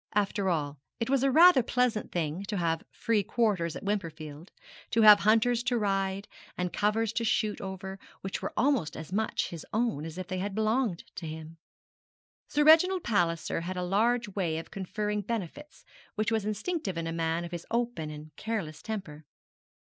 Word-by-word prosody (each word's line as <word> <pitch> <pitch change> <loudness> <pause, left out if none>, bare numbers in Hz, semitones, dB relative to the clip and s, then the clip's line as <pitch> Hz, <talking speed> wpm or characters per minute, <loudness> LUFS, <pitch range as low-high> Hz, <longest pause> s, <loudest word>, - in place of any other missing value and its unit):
After 200 -1 +1
all 150 -4 -1 0.2
it 230 +3 -1
was 275 -2 +3
a 275 - +3
rather 320 0 +7
pleasant 245 -2 0
thing 165 +2 -2
to 205 0 -3
have 165 -2 0
free 225 -2 0
quarters 200 -6 0
at - - -7
Wimperfield, 165 -5 -4 0.4
to 225 - +3
have 210 -1 +10
hunters 225 +3 +3
to 245 -1 +2
ride, 195 -1 -1 0.3
and 180 -1 -2
covers 215 +1 +1
to 235 - -1
shoot 215 -2 0
over 190 0 -6 0.2
which 195 - -4
were - - -3
almost 235 - +1
as 160 +3 -8
much 220 +2 0
his 165 -2 -7
own 225 -9 0
as 165 +1 -7
if 185 - -4
they 185 0 -4
had 195 +1 -3
belonged 220 -3 +1
to 165 - -5
him. 160 +1 -8 0.9
Sir 295 - +2
Reginald 340 +4 +6
Palliser 170 -7 0
had 180 +2 -4
a 180 - -1
large 230 +6 +2
way 180 -5 -1
of 165 - -7
conferring 210 +2 -2
benefits, 230 - -6 0.3
which 215 +1 0
was 220 -2 0
instinctive 215 - -2
in 165 - -2
a 165 - -2
man 165 +1 -1
of 170 - -8
his 175 -1 -6
open 235 -9 -1
and 150 -1 -10
careless 190 -9 -4
temper. 185 -9 -6
200 Hz, 180 wpm, -29 LUFS, 170-225 Hz, 0.9 s, have